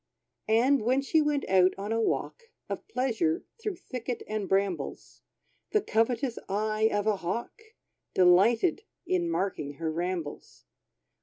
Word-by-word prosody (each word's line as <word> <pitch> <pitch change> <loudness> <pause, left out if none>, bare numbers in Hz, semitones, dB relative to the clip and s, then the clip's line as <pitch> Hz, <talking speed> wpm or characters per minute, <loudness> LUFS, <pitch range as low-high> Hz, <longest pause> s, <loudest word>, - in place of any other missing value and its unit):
And 245 +4 +4
when 255 +5 +2
she 315 +3 +3
went 295 -2 0
out 185 -1 +4
on 200 +2 -4
a 225 0 +1
walk 460 - -2 0.2
Of - - -5
pleasure, 320 - 0 0.2
through 420 -3 -2
thicket 250 -6 -5
and 210 -2 -3
brambles, 195 -2 -2 0.5
The 425 - +4
covetous 235 - 0
eye 215 +2 +1
of 205 0 0
a 215 -2 +2
Hawk 230 - -4 0.5
Delighted 210 - +4 0.2
in 350 -1 0
marking 190 - -2
her 160 +2 -3
rambles. 170 -2 -4
225 Hz, 135 wpm, -28 LUFS, 195-280 Hz, 0.5 s, And